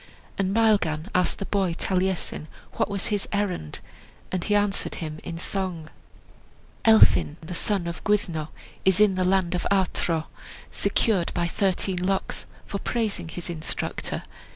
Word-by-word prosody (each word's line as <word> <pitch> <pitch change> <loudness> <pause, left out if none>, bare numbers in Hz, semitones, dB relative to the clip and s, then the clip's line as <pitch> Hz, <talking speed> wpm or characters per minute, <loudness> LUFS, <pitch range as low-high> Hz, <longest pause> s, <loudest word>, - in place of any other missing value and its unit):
And 195 -1 0
Maelgan 200 -6 +2
asked 180 0 +2
the 195 - -4
boy 190 -5 0
Taliesin 185 -4 -1 0.2
what - - 0
was 200 +1 -2
his 205 - -1
errand, 195 - -2 0.5
and 185 -2 -1
he 205 - +1
answered 205 -1 +1
him 155 -2 -5
in 165 - -5
song: 175 -3 -2 0.9
"Elphin, 220 -8 +6
the 160 +2 -7
son 190 +1 0
of 170 0 -5
Gwyddno, 175 -7 0 0.4
Is 190 0 +3
in 210 -2 +6
the 185 0 0
land 185 -1 +2
of 180 - 0
Artro, 175 -4 +1 0.5
Secured 195 -7 +2
by 175 - +1
thirteen 185 0 0
locks, 195 +1 -1 0.2
For 200 - -4
praising 220 -5 -1
his 175 +1 -6
instructor. 160 -3 -3
185 Hz, 145 wpm, -26 LUFS, 170-200 Hz, 0.9 s, Elphin